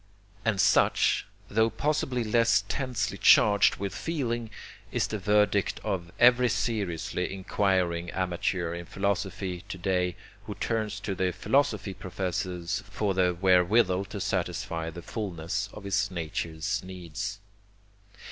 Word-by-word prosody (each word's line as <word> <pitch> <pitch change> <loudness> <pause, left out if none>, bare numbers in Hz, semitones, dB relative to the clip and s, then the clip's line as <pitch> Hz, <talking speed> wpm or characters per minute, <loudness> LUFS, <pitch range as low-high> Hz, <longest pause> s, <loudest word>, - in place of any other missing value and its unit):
And 110 -4 +1
such, 100 -1 +3 0.2
tho 110 +2 +2
possibly 130 -1 -1
less 115 0 +3
tensely 125 -6 -2
charged 100 -2 +6
with 100 -1 -4
feeling, 120 - -2 0.4
is - - +1
the 110 - -4
verdict 105 -1 +2
of 85 -2 -3
every 125 0 +6
seriously 95 -5 -2
inquiring 95 -3 0
amateur 90 -1 -1
in 85 0 -6
philosophy 95 -2 -2
to 95 - -5
day 90 -1 0 0.3
who - - -5
turns 110 -2 -2
to 100 - -2
the 95 -1 0
philosophy 100 +1 +1
professors 95 0 -3
for 100 0 -1
the 90 -2 +2
wherewithal 95 +1 +4
to 100 +1 -7
satisfy 80 -3 -2
the 85 +1 -9
fulness 100 +1 -3
of 105 - -10
his 100 0 0
nature's 80 -2 -3
needs. 90 0 -5
95 Hz, 125 wpm, -28 LUFS, 90-105 Hz, 0.4 s, charged